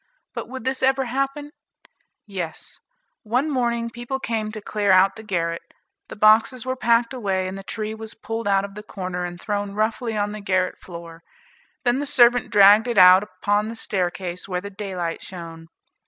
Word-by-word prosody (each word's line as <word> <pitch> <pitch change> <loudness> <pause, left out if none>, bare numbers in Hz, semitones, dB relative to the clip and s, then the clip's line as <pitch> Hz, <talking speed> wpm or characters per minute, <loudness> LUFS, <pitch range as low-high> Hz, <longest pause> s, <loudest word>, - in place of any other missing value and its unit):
But - - -6
would 260 0 -7
this 260 0 -1
ever 265 0 +2
happen? 275 +4 -2 0.7
Yes; 180 -6 -6 0.4
one 250 +7 0
morning 235 -3 -1
people 240 +3 -5
came 220 -4 -2
to 215 - -7
clear 205 -1 0
out 190 +1 +5
the 220 - -9
garret, 170 -5 -2 0.5
the - - -7
boxes 220 +4 +4
were 260 0 -1
packed 235 0 +2
away, 195 -6 -1
and 190 - -5
the 195 - -7
tree 215 +2 -5
was 220 0 -9
pulled 225 0 -5
out 195 0 +2
of 200 - -10
the 210 - -8
corner, 185 -4 -5
and 175 0 -7
thrown 205 -1 -3
roughly 220 +1 -1
on 205 0 0
the 210 0 -7
garret 185 -2 0
floor; 170 -2 -10 0.6
then 245 +2 +2
the 290 - -3
servant 245 -3 +4
dragged 205 +3 +6
it 235 -3 -2
out 185 0 +9
upon 205 +2 -1
the 230 - -6
staircase 180 -3 -3
where 180 -2 -2
the 200 +2 -8
daylight 190 -4 -4
shone. 165 -3 -9
210 Hz, 185 wpm, -23 LUFS, 185-235 Hz, 0.7 s, out